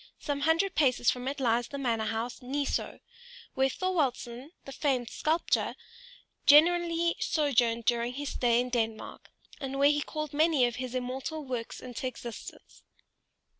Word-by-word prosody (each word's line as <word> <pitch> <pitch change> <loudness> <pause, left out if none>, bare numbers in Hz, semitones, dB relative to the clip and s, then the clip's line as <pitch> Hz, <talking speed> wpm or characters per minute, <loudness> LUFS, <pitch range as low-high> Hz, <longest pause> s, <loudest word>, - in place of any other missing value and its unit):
Some 285 -2 -3
hundred 325 +6 +2
paces 255 -6 +3
from 250 +1 -5
it 280 +2 -3
lies 240 -2 +1
the 280 - -6
manor 230 -5 0
house 230 +3 -3
Ny 275 +3 -2
Soe, - - -3 0.5
where 265 0 +2
Thorwaldsen, 270 -7 -2 0.2
the 275 - -8
famed 260 -5 -1
sculptor, 320 +2 0 0.7
generally 335 +2 +5
sojourned 240 -6 +1
during 240 0 +1
his 285 +1 -4
stay 240 -1 +2
in 250 +1 -1
Denmark, 225 -3 -3 0.3
and 270 0 -4
where 280 +1 +5
he 295 0 0
called 305 0 -5
many 305 -3 +4
of 240 0 -2
his 255 0 -5
immortal 265 +5 -4
works 245 -3 -5
into 250 +1 -5
existence. 240 -2 -9
265 Hz, 150 wpm, -29 LUFS, 240-295 Hz, 0.7 s, generally